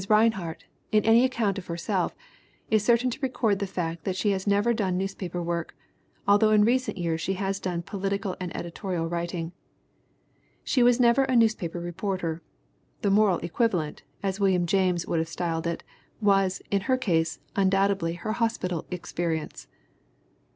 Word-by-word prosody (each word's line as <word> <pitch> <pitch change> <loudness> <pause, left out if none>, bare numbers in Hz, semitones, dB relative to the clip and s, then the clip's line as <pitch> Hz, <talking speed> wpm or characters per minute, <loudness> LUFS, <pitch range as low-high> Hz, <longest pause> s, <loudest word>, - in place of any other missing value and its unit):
Rinehart, 210 -6 +2 0.3
in 215 -1 +3
any 225 +2 +6
account 230 -6 0
of 180 - -11
herself, 170 0 -1 0.6
is 215 -2 +4
certain 240 +2 +3
to 240 - -6
record 230 -6 +1
the 200 - -2
fact 170 -3 -3
that 190 - -2
she 205 +2 +1
has 190 0 -2
never 205 +4 +3
done 190 -5 0
newspaper 185 -2 -3
work, 170 -1 -3 0.5
although 205 +2 +5
in 210 -1 +5
recent 255 -1 +1
years 165 -2 -1
she 190 +4 -1
has 195 0 -2
done 175 -3 -3
"political 195 0 -2
and 180 -1 -3
editorial 170 -1 -3
writing." 170 0 -3 1.1
She 255 - +1
was 245 0 +5
never 245 +2 +5
a 260 -1 0
newspaper 215 -7 +2
reporter. 175 -1 -3 0.6
The 200 - +3
"moral 200 -3 +4
equivalent," 170 -4 0 0.2
as 195 0 -1
William 190 -3 +3
James 180 -1 +1
would 165 - 0
have 160 0 -2
styled 165 -1 -2
it, 170 - -3 0.4
was, 195 -3 +2
in 200 -1 +2
her 260 - +4
case, 165 -9 0 0.2
undoubtedly 195 -3 +2
her 175 +5 -4
hospital 220 -7 -1
experience. 170 - -4
195 Hz, 160 wpm, -27 LUFS, 170-215 Hz, 1.1 s, any